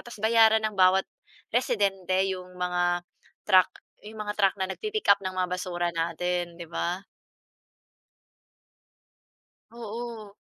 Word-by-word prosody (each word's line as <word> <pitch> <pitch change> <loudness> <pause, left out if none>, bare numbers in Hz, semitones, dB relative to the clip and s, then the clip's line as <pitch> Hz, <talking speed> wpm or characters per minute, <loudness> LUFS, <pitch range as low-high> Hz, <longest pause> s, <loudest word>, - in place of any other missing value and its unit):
tapos 240 -3 -11
bayaran 220 -1 +5
ng 215 - 0
bawat, 190 0 +4 0.5
residente 200 -6 +1 0.2
'yong, 180 -1 -9
mga 175 0 0 0.4
truck 185 -3 +5 0.3
'yong 215 +1 -10
mga 210 0 -4
truck 195 -2 +4
na 190 - +1
nag-pi-pick-up 420 - +1
ng 185 - -1
mga 185 0 0
basura 175 -1 -2
natin, 170 +1 -2
'di 170 - -7
ba? 180 +3 -3 2.7
Oo. 230 -2 -7
190 Hz, 115 wpm, -27 LUFS, 180-220 Hz, 2.7 s, bayaran